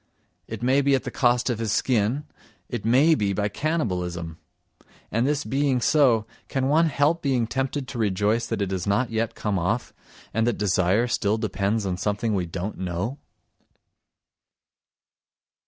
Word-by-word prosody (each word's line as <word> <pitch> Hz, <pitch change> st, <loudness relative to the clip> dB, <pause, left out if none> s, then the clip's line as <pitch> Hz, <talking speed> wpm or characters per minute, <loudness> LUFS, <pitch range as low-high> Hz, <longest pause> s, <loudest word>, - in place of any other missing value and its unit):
It -, -, -6 dB
may 130 Hz, +3 st, +3 dB
be 140 Hz, 0 st, +3 dB
at 130 Hz, -, -1 dB
the -, -, -5 dB
cost 120 Hz, -1 st, +2 dB
of 115 Hz, -, -3 dB
his 110 Hz, -3 st, -1 dB
skin, 120 Hz, +4 st, +1 dB, 0.4 s
it 120 Hz, -4 st, -4 dB
may 130 Hz, +9 st, +5 dB
be 105 Hz, -8 st, 0 dB
by 105 Hz, +1 st, 0 dB
cannibalism! 90 Hz, -, -2 dB, 0.7 s
And 115 Hz, +4 st, +1 dB
this 145 Hz, -1 st, 0 dB
being 135 Hz, +2 st, +1 dB
so, 120 Hz, -5 st, +3 dB, 0.2 s
can 135 Hz, -1 st, -1 dB
one 160 Hz, +4 st, +4 dB
help 155 Hz, +2 st, +1 dB
being 130 Hz, -5 st, +1 dB
tempted 135 Hz, +3 st, -2 dB
to 125 Hz, -, -6 dB
rejoice 105 Hz, +2 st, +1 dB
that 110 Hz, -3 st, -1 dB
it 95 Hz, -, -3 dB
has 95 Hz, -1 st, -3 dB
not 105 Hz, +5 st, +1 dB
yet 115 Hz, 0 st, -1 dB
come 105 Hz, -3 st, -1 dB
off, 110 Hz, +8 st, -1 dB, 0.4 s
and 115 Hz, +1 st, +1 dB
that 120 Hz, -, 0 dB
desire 100 Hz, +2 st, +2 dB
still 110 Hz, -3 st, 0 dB
depends 105 Hz, 0 st, -1 dB
on 90 Hz, -2 st, -2 dB
something 105 Hz, +4 st, -1 dB
we 90 Hz, -3 st, -1 dB
don't 95 Hz, +5 st, -5 dB
know? 95 Hz, -, -3 dB
115 Hz, 160 wpm, -25 LUFS, 100-130 Hz, 0.7 s, may